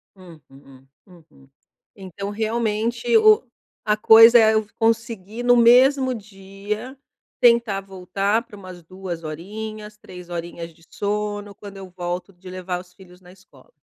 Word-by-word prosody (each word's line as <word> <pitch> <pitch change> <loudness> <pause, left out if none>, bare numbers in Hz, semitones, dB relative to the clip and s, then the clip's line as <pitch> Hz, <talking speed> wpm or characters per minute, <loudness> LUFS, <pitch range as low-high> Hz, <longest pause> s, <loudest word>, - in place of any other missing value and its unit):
Uhum, 140 -7 -17 0.2
uhum. 165 -7 -21 0.5
Então, 195 0 -8
realmente 225 +2 -1
o 215 -1 +5 0.4
a 210 - +2
coisa 225 +2 +7
é 220 -1 +5
eu 220 -1 0
conseguir 225 -1 -2
no 245 0 +4
mesmo 255 +3 +4
dia, 210 +3 -8 0.4
tentar 235 -4 +3
voltar 195 +2 -2
pra 205 - -14
umas 185 -3 -12
2 180 -1 -8
horinhas, 210 +6 -8
3 180 -3 -13
horinhas 170 -1 -7
de 165 - -25
sono, 205 0 -4
quando 200 -1 -12
eu 190 -1 -10
volto 175 +1 -5
de 185 +1 -14
levar 180 -1 -5
os 180 0 -21
filhos 180 -1 -18
na 180 0 -17
escola. 190 - -22
200 Hz, 140 wpm, -21 LUFS, 180-220 Hz, 0.5 s, coisa